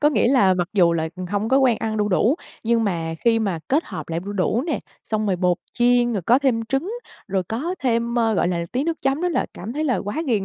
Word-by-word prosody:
Có 295 - +5
nghĩa 240 - +2
là, 200 -9 +4
mặc 175 -1 -1
dù 175 -5 +4
là 160 -1 -1 0.2
hông 205 +2 -1
có 270 - +4
quen 250 -4 +4
ăn 220 -1 -2
đu 210 0 +1
đủ, 220 +8 +3 0.3
nhưng 230 0 +2
mà 165 -4 -2
khi 230 -1 +4
mà 195 -7 -1
kết 295 +5 +2
hợp - - -7
lại 165 +1 -2
đu 200 +3 -6
đủ 205 +5 0
nè, 310 - -1 0.2
xong 215 -1 -2
rồi 190 -2 +1
bột 180 -1 +2 0.2
chiên, 240 0 +3
rồi 195 -5 -2
có 240 +8 +4
thêm 250 -5 +1
trứng, 270 - -2 0.4
rồi 190 -1 0
có 275 - -3
thêm, 235 -1 0
ơ, 225 -2 +2
gọi 175 - +2
là, 170 -1 -1
tí 260 +4 0
nước 330 -1 -3
chấm 275 +3 +1
nữa 360 - +1
là 340 - 0
cảm 215 +7 -6
thấy 305 +3 -2
là 255 -5 +1
quá 275 +11 -3
ghiền 215 -6 +1
225 Hz, 265 wpm, -22 LUFS, 190-260 Hz, 0.4 s, Có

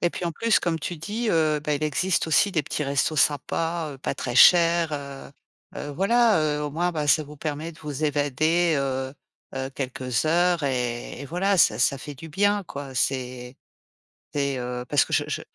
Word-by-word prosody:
Et 175 - +1
puis 180 - -5
en 170 - -1
plus, 230 +6 +2
comme 165 -2 -1
tu 175 +2 -5
dis, 215 +8 -3
heu, 155 -3 +2
bah, 150 0 -1
il 145 - -4
existe 170 +5 0
aussi 200 +5 +3
des 155 - +1
petits 150 +1 -3
restos, 140 +3 0
sympas 165 +3 0
heu, 135 - -12
pas - - -3
très 125 -1 -4
chers, 170 0 +6
heu 140 -2 -7 0.5
heu, 145 - -5
voilà. 215 +7 +3
Heu, 150 -1 0
au 150 - -3
moins, 175 +4 -1
bah, 150 -2 -2
ça 155 - +4
vous 150 +1 -12
permet 155 +2 -4
de 155 - -18
vous 150 0 -4
évader, 155 +4 +1
heu 130 -1 -2 0.4
heu, 135 0 -4
quelques 130 -1 -2
heures 175 +1 +2
et 125 -2 -2
et - - -6
voilà, 185 +5 0
ça - - +4
ça 135 +3 +2
fait 145 +2 -8
du 160 +4 -10
bien, 205 +5 +1
quoi. 140 -4 -8
C'est 125 -1 -2 0.8
c'est, 140 -2 -1
heu, 125 0 -4
parce 145 - +3
que - - -10
je - - +2
je - - -3
150 Hz, 205 wpm, -24 LUFS, 135-170 Hz, 0.8 s, chers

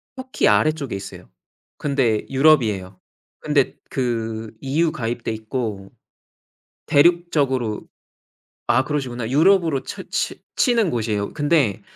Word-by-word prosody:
터키 260 0 -1
아래쪽에 150 -8 +1
있어요. 95 -10 -9 0.5
근데 130 -7 0
유럽이에요. 115 -10 +2 0.4
근데 145 -3 +1
그 115 -3 -3
EU 155 +4 +1
가입돼 115 -5 -3
있고 110 -3 -5 0.9
대륙적으로 145 -8 +2 0.8
아 120 +2 +3
그러시구나. 125 -6 -3
유럽으로 160 -2 +3
쳐 - - -7
치 - - -3
치는 235 -7 +3
곳이에요. 110 -3 -2
근데 145 - +1
130 Hz, 255 characters per minute, -21 LUFS, 110-155 Hz, 0.9 s, 아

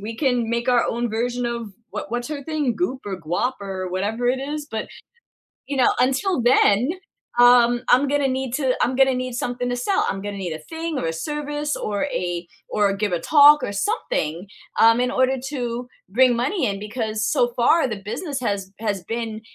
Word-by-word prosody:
we 225 +2 -6
can 245 -4 +1
make 235 +2 -1
our 245 -1 +4
own 235 -1 -1
version 240 +2 -1
of 235 -3 -4 0.2
what 195 - -6
what's 240 +3 -3
her 290 -2 -5
thing, 295 -5 -1
Goop 270 -7 -2
or 190 -2 -5
Guap 175 +10 -1
or 190 -2 -5
whatever 210 +6 -2
it 260 - +1
is, 295 +2 -4
but, 220 -1 -4 0.8
you 280 - -3
know, 255 - +4
until 270 +7 +1
then, 240 0 +4 0.5
um, 245 0 +6
I'm 255 +3 +5
gonna 280 -1 +1
need 260 -1 -2
to 265 -3 +1
I'm 255 - +1
gonna 265 0 +4
need 255 0 -3
something 245 0 -2
to 245 - -1
sell. 380 +11 0
I'm 195 - -3
gonna 205 0 -5
need 185 -4 -4
a 155 - -5
thing 325 - -5
or 215 - -2
a 165 - -1
service 295 - -3
or 205 +2 -2
a 175 -10 -3 0.2
or 205 -1 +2
give 205 0 -1
a 175 - +1
talk 295 - +6
or - - -3
something, 195 - -2 0.3
um, 230 +1 +6
in 250 0 +1
order 260 +1 +2
to 245 -3 -4 0.2
bring 245 +4 +4
money 275 +10 0
in 200 -1 -2
because 215 0 -3
so 245 -4 +2
far, 270 +5 +4
the 215 - -3
business 265 - -4
has 200 -5 -2
has 205 -4 -2
been 225 0 -4
245 Hz, 200 wpm, -22 LUFS, 210-265 Hz, 0.8 s, um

